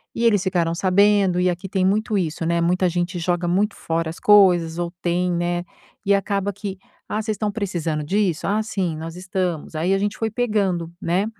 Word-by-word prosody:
e 235 - 0
eles 210 -4 +4
ficaram 175 -3 0
sabendo 195 0 +3
e 180 - +3
aqui 180 +2 -4
tem 190 -1 +1
muito 210 +2 +1
isso, 165 -2 -2
né, 170 0 +1
muita 180 +2 +2
gente 175 +1 -2
joga 175 +1 -1
muito 200 +4 +1
fora 165 0 -2
as 165 - -8
coisas 180 -5 +5
ou 170 -1 -2
tem, 180 +1 0
né, 175 0 -1 0.4
e 200 - +4
acaba 200 0 -1
que: 200 -1 -6 0.3
"Ah, 215 - -1
vocês 215 0 -2
estão 205 0 -2
precisando 170 -7 -2
disso?", 185 -1 0
"ah, 210 +2 +1
sim, 185 -7 -2
nós 165 +1 -7
estamos", 180 -4 -3
aí 170 +5 +1
a - - +3
gente 205 +1 -2
foi 220 -1 -2
pegando, 200 -8 0
né. 180 +3 +1
185 Hz, 200 wpm, -22 LUFS, 170-205 Hz, 0.4 s, coisas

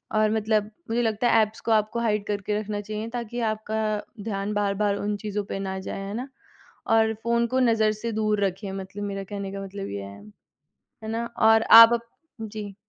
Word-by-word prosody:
और 215 0 +3
मतलब 215 -1 +1 0.2
मुझे 235 +1 +1
लगता 225 +1 +1
है 225 - +6
ऐप्स 215 +1 -2
को 230 - -2
आपको 215 +2 +2
हाइड 210 -3 0
करके 210 0 -1
रखना 210 -1 -4
चाहिए 215 +1 -5
ताकि 240 0 -5
आपका 220 0 -4 0.4
ध्यान 205 -1 -3
बार-बार 205 0 +1
उन 205 +1 -2
चीज़ों 210 0 -3
पे 195 - -5
ना 190 -1 -3
जाए। 190 +1 -6
है 200 - -5
ना? 255 +4 -5 0.6
और 220 0 +3
फ़ोन 235 0 +2
को 260 +2 0
नज़र 225 -3 +3
से 230 - -2
दूर 215 -1 0
रखें 195 +1 -4
मतलब 195 +1 -6
मेरे 195 -1 -4
कहने 200 -1 -5
का 195 - -5
मतलब 195 0 -6
ये 100 0 -5
है। 100 +1 -10 0.8
है 220 - -5
ना? 230 +1 -2
और 225 0 +5
आप 230 +1 +10
अप 235 0 -2 0.3
जी। 210 -2 -6
215 Hz, 200 wpm, -25 LUFS, 200-225 Hz, 0.8 s, आप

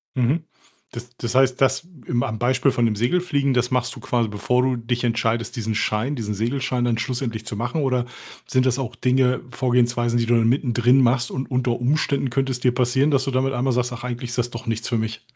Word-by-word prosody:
Mhm, 135 +6 +1 0.5
das 120 0 -8
das 120 +1 -4
heißt, 130 -1 +3
das 135 +5 +2 0.2
im 120 0 0
am, 110 0 -3
Beispiel, 130 +2 +2
von 120 -2 +1
dem 110 -2 +1
Segelfliegen. 140 - +1
Das 125 0 +1
machst 125 -1 0
du - - -10
quasi, 120 -3 0
bevor 105 +5 0
du 130 -1 +1
dich 120 +1 -2
entscheidest, 115 -1 0
diesen 110 -1 -2
Schein, 110 +6 0
diesen 105 -5 -3
Segelschein, 125 +3 -1
dann 120 -2 +1
schlussendlich 115 -2 -3
zu 110 - -4
machen, 120 +8 -2
oder 125 -3 +1 0.4
sind 130 -1 +2
das 130 0 +1
auch 120 -3 -4
Dinge, 125 +1 +2
Vorgehensweisen, 120 -1 +1
die 115 - +1
du 120 +1 +2
dann 115 -1 +3
mittendrin 125 0 +3
machst, 120 -1 +2
und 130 +1 -4
unter 125 -1 +1
Umständen, 140 +1 0
könnte 135 +2 0
es 125 - -4
dir 125 -1 +2
passieren, 130 +4 +2
dass 135 -2 +2
du 135 - -1
damit 135 +1 0
einmal 125 +1 0
sagst: 125 +1 0
„Ach, 120 0 -8
eigentlich 125 0 -4
ist 125 - -4
das 120 0 0
doch 115 - -7
nichts 115 0 -2
für 120 - +1
mich?“ 110 0 -3
125 Hz, 225 wpm, -22 LUFS, 115-130 Hz, 0.5 s, heißt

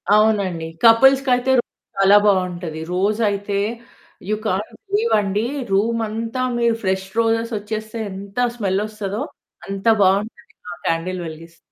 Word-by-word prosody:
అవునండి. 200 -6 +2 0.2
కపుల్స్‌కి 270 +4 +6
అయితే 250 +2 0 0.5
చాలా 195 +1 +6
బావుంటది. 180 -5 0
రోజ్ 200 +4 +1
అయితే 200 0 -2 0.7
యు 215 - +2
కాంట్ 200 +2 -2 0.2
బిలీవ్ 420 +4 +1
అండి, 205 +2 -1 0.3
రూమ్ 230 +4 +1
అంతా 230 +3 -3 0.2
మీరు 235 -1 +2
ఫ్రెష్ 190 0 -1
రోజెస్ 230 0 +1
ఓచ్చేస్తే 215 +2 -5
ఎంత 195 +2 -10 0.2
స్మెల్ 195 -3 0
ఓస్తదో? 215 +2 -4 0.4
అంత 195 0 -6 0.2
బావుంటది 210 +5 0 0.2
ఆ - - -9
క్యాండిల్ 180 +3 -1
వెలిగిస్తే. 165 +1 -11
205 Hz, 130 wpm, -20 LUFS, 190-225 Hz, 0.7 s, కపుల్స్‌కి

